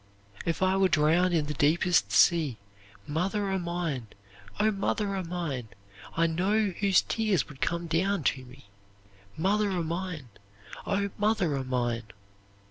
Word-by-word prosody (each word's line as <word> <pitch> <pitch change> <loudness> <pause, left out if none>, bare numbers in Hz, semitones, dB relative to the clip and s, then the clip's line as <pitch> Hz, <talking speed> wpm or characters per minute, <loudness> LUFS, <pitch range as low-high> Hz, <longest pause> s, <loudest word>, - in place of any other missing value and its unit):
"'If 165 +2 0
I 190 +1 +3
were 195 0 +4
drowned 165 +3 +3
in 160 -3 +1
the 150 - -3
deepest 165 +5 +2
sea, 155 -9 +4 0.5
Mother 195 +7 -1
o' 190 - 0
mine, 170 -8 -3 0.5
O 215 +1 +3
mother 200 0 -1
o' 190 - -2
mine! 165 -9 -4 0.5
I 165 - +4
know 195 +6 +1
whose 195 -2 +4
tears 215 -7 0
would 140 -3 -13
come 170 0 -1
down 175 +2 0
to 130 -1 0
me, 130 +2 -15 0.7
Mother 205 +5 +1
o' 180 -3 -1
mine, 165 -5 -4 0.6
O 200 0 0
mother 205 -7 +1
o' 135 - -2
mine! 120 -3 -1
175 Hz, 145 wpm, -28 LUFS, 150-195 Hz, 0.7 s, were